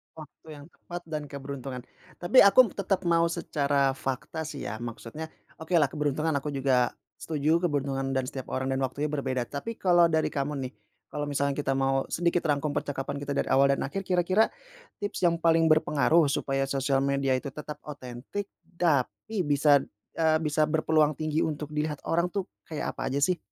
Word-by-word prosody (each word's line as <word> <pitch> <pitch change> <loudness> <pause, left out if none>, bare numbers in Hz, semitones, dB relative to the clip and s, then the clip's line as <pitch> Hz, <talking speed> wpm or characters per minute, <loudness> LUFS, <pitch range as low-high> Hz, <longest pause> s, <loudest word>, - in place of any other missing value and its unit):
Waktu 155 0 -13
yang 145 - -12
tepat 175 0 -9
dan 150 -1 -3
keberuntungan, 135 -2 -6 0.3
tapi 180 +9 +4
aku 210 +2 +7
tetap 195 -1 -1
mau 170 -1 +3
secara 140 -5 +1
fakta 135 +4 -4
sih 145 -2 -6
ya 105 +2 -5
maksudnya 120 +6 -6 0.3
okelah 160 -3 +2
keberuntungan 150 +1 0
aku 145 0 -5
juga, 130 -2 +2 0.2
setuju 155 +1 +1
keberuntungan 135 -2 -2
dan 130 - +1
setiap 130 0 -6
orang 130 0 -2
dan 130 - 0
waktunya 140 +3 -2
berbeda 130 -4 -1
tapi 145 - -6
kalau 175 -3 +4
dari 160 -1 +1
kamu 145 +1 -2
nih, 130 - -5 0.4
kalau 145 0 -3
misalkan 140 0 0
kita 135 -1 -1
mau 135 0 +1
sedikit 175 0 0
rangkum 145 0 0
percakapan 140 -1 -3
kita 140 0 -4
dari - - -1
awal 140 +1 +5
dan - - -3
akhir 195 +7 -4
kira-kira, 185 +4 +3 0.5
tips 205 -2 -4
yang 170 -1 +3
paling 165 -1 +3
berpengaruh 155 +1 +4
supaya 135 -1 0
sosial 135 0 0
media 140 0 0
itu - - -9
tetap 150 +2 -7
otentik 140 +8 -6 0.2
tapi 170 - 0
bisa, 145 0 +5 0.4
eee, 160 -1 +4
bisa 150 0 +2
berpeluang 155 -1 +2
tinggi 155 +1 -2
untuk 150 -1 -4
dilihat 150 -1 -2
orang 170 +1 +1
tuh 195 -2 -3 0.2
kayak 155 -3 -4
apa 135 0 -2
aja 140 - 0
sih? 180 +2 +2
150 Hz, 175 wpm, -28 LUFS, 135-165 Hz, 0.5 s, aku